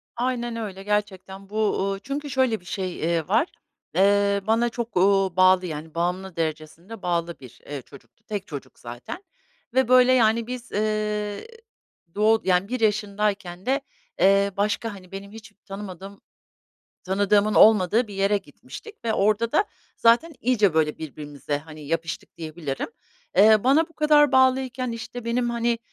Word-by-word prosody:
Aynen 240 -1 -2
öyle, 200 -4 -6
gerçekten. 195 -1 -3
Bu, 215 0 0
ııı, 195 0 -3
çünkü 280 +7 -5
şöyle 260 -5 +1
bir 180 - -23
şey, 185 0 -4
eee, 165 -1 -1
var. 215 - +2 0.5
Eee, 200 +1 +3
bana 230 +2 +2
çok, 235 -3 -5
ııı, 195 -1 +3
bağlı, 185 0 +5
yani, 160 -1 -7
bağımlı 180 +2 -2
derecesinde 165 +6 -5
bağlı 170 -2 -2
bir, 130 -3 -14
eee, 145 -1 -6
çocuktu. 140 - -18
Tek 205 -2 -4
çocuk 145 -6 -9
zaten 120 - -8 0.5
ve, 260 -1 +3
böyle, 255 0 +6
yani, 230 -2 +3
biz, 250 0 -7
ııı, 210 -1 -1 0.8
doğ 220 +2 +3
yani, 185 +1 +2
bir 250 +3 -3
yaşındayken 205 -4 -1
de, 270 +2 +1 0.4
ııı, 195 0 +3
başka, 210 +2 -1
hani, 185 -2 -13
benim 195 +1 -8
hiç 215 -1 -12
tanımadığım 195 0 -9 0.8
tanıdığımın 205 +2 +2
olmadığı 220 +2 +5
bir 205 - -9
yere 195 +1 +2
gitmiştik 430 - -13
ve 225 - +1
orada 215 +3 +1
da 410 - +3 0.3
zaten 240 +9 +3
iyice, 215 -8 +2
böyle, 155 -1 +1
birbirimize, 145 -1 -5
hani, 155 -1 -12
yapıştık 165 +2 -4
diyebilirim. 155 -4 -5 0.5
Eee, 215 +1 +6
bana 290 +5 +4
bu - - -22
kadar 300 -2 +4
bağlıyken, 260 -1 +2
işte, 230 +1 -7
benim, 240 +1 0
hani, 235 0 0
205 Hz, 150 wpm, -24 LUFS, 180-230 Hz, 0.8 s, böyle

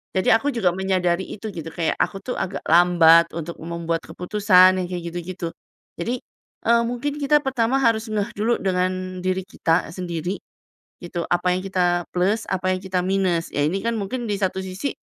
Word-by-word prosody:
Jadi 185 - +2
aku 275 +6 +2
juga 205 -9 +1
menyadari 185 -1 0
itu 215 +1 -6
gitu, 165 -1 -6
kayak 165 -1 -1
aku - - 0
tuh 250 - -3
agak 190 +1 -4
lambat 170 -1 +6
untuk 170 0 -5
membuat 165 0 -3
keputusan 185 +1 +4
yang 175 - -3
kayak 175 -2 -4
gitu-gitu. 175 0 -5 0.5
Jadi, 240 +8 -2 0.5
eee, 235 0 +5
mungkin 285 +5 -3
kita 295 +1 +3
pertama 260 -1 +1
harus 230 0 +2
ngeh 210 -2 -2
dulu 230 +3 +2
dengan 185 0 -1
diri 185 +1 -1
kita 165 -4 0
sendiri, 175 +1 -4 0.6
gitu, 175 0 -5
apa 180 +1 +2
yang 185 - -2
kita 180 -2 +1
plus, 200 +5 +1
apa 185 0 0
yang 185 - -4
kita 185 -1 -1
minus. 185 -3 +1
Ya 145 - +1
ini 180 +6 0
kan 235 - 0
mungkin 235 +4 -3
di - - +1
satu 190 -1 -1
sisi, 190 +9 -3
185 Hz, 180 wpm, -23 LUFS, 175-210 Hz, 0.6 s, lambat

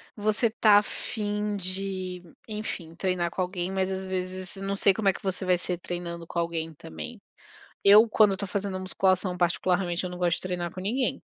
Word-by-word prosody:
você 215 +2 +1
tá 215 -2 +5
a 205 - +5
fim 210 -1 -3
de, 185 -1 -4 0.2
enfim, 210 -6 -5
treinar 180 -1 0
com 185 - -3
alguém, 180 0 -2
mas 190 0 0
às 190 0 -3
vezes 185 0 -4
não 195 +1 -2
sei 200 0 +4
como 200 0 +2
é - - +3
que - - -10
você 190 0 -2
vai 180 -1 +3
ser 180 0 -3
treinando 175 -1 -5
com 170 - -3
alguém 165 -1 -2
também. 80 - -8 0.6
Eu, 210 +3 +8
quando 210 -2 +5
eu - - -1
tô 200 - -4
fazendo 195 -1 -2
musculação, 185 0 +1
particularmente, 180 0 +1
eu 180 - -3
não 180 - -7
gosto 175 -1 +2
de - - -4
treinar 175 -2 -2
com 185 - -8
ninguém. 240 +7 0
185 Hz, 200 wpm, -27 LUFS, 180-200 Hz, 0.6 s, Eu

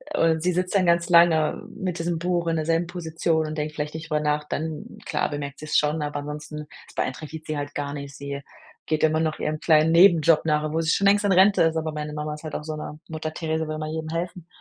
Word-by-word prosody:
oder 160 -1 +3
sie 180 +2 +1
sitzt 180 +2 -1
dann 185 -2 +4
ganz 170 0 +2
lange 170 -3 +4
mit 180 -2 -4
diesem 165 -1 -1
Buch 175 -1 0
in 165 - +1
derselben 165 +2 +1
Position 165 -2 -1
und 155 - -5
denkt 150 0 -3
vielleicht 150 0 -3
nicht 165 +1 -7
drüber 150 -1 +1
nach, 150 0 0
dann, 155 0 -4
klar, - - 0
bemerkt 140 -1 -5
sie's 155 -1 0
schon, 150 +1 +1
aber 145 0 -3
ansonsten 150 +1 -7 0.2
es - - -17
beeinträchtigt 155 +4 -4
sie 155 - -2
halt 145 0 -5
gar 145 -1 -3
nicht. 140 -1 -7
Sie 140 0 -6 0.4
geht 155 0 0
immer 155 0 +3
noch 160 -1 -1
ihrem 155 0 -2
kleinen 155 0 +4
Nebenjob 165 -3 +6
nach, 150 -1 +2
obwohl 155 +2 -1
sie 160 - -1
schon 200 - +2
längst 205 +1 +4
in 200 - +3
Rente 190 +2 +5
ist, 160 0 +2
aber 160 0 -2
meine 150 0 -5
Mama 150 0 -3
ist 150 - -13
halt 155 - -5
auch 150 - -4
so 155 0 -4
'ne 150 0 -7
Mutter 155 0 -4
Therese, 160 -1 -2
will 155 - -3
immer 155 0 -4
jedem 160 0 -4
helfen. 170 +1 -4
155 Hz, 245 wpm, -24 LUFS, 150-165 Hz, 0.4 s, Nebenjob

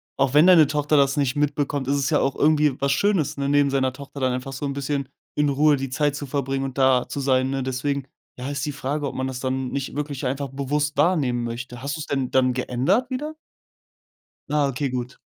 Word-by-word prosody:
auch 135 0 +1
wenn 155 +4 +7
deine 165 -6 +7
Tochter 150 +1 0
das 140 0 +3
nicht 140 -2 +1
mitbekommt, 145 -2 -1
ist 140 - +2
es 140 +1 0
ja 150 - +3
auch 135 - 0
irgendwie 150 -2 +3
was 140 0 +1
Schönes, 190 -1 +1
ne, 140 0 -1
neben 145 -1 +3
seiner 130 -2 +1
Tochter 140 +1 -10
dann 130 -1 +1
einfach 130 +2 -4
so 140 +3 -4
’n 140 - -2
bisschen 140 -1 -3 0.3
in 150 -1 +2
Ruhe 145 +2 +4
die 135 -1 -4
Zeit 145 +1 0
zu 145 -1 -5
verbringen 135 0 -2
und 135 0 -6
da 130 -2 +3
zu 140 - -4
sein, 130 -1 +2
ne, 135 -1 -2
deswegen, 135 +1 -2 0.3
ja, 130 +3 -5
ist 140 0 -2
die 145 - -2
Frage, 145 +1 -2
ob - - -6
man 130 0 -2
das 130 -1 -5
dann 130 0 -2
nicht 140 0 -4
wirklich 145 -2 -4
einfach 135 +1 -3
bewusst 145 +2 -2
wahrnehmen 145 -7 +2
möchte. 120 +1 -6
Hast 140 +2 -3
du’s 155 - -5
denn 135 -3 -1
dann 130 -1 +3
geändert 135 - 0
wieder? 300 +5 -4 1.1
Ah, 145 -1 +2
okay, 135 +1 -2
gut. 125 0 -4
140 Hz, 225 wpm, -23 LUFS, 130-145 Hz, 1.1 s, wenn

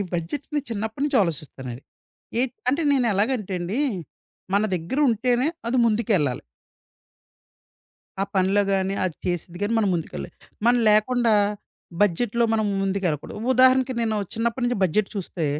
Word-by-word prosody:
బడ్జెట్‌ని 265 - -3
చిన్నప్పటినుంచి 225 +7 -1
ఆలోసిస్తానండి. 140 -7 -5 0.6
ఏ - - +3 0.3
అంటే 280 +6 +2
నేనేలాగంటేండి 210 -4 0 0.8
మన 200 - +3
దగ్గర 175 - -3
ఉంటేనే 245 +3 +1 0.2
అది 240 +2 0
ముందుకెళ్ళాలి. 210 - +1 1.8
ఆ - - +2
పనులో 190 +2 +3
గాని 195 0 0
అది 180 -4 -2
చేసేది 175 0 -3
గాని 210 +3 0
మనం 210 - +2
ముందుకెళ్లే‌ము. 155 - -5 0.3
మనం 245 0 +5
లేకుండా 230 +1 +3 0.7
బడ్జెట్‌లో 210 +4 +2
మనం 220 -1 +1 0.2
ముందుకు 195 0 -1
వెళ్ళకూడదు. 150 +2 -3 0.2
ఉదాహరణకి 260 0 +4
నేను 220 -2 0 0.2
చిన్నప్పటి 235 +2 -1
నుంచి 245 -2 0
బడ్జెట్ 190 +3 +2
చూస్తే, 180 -4 -3
210 Hz, 120 wpm, -24 LUFS, 180-240 Hz, 1.8 s, మనం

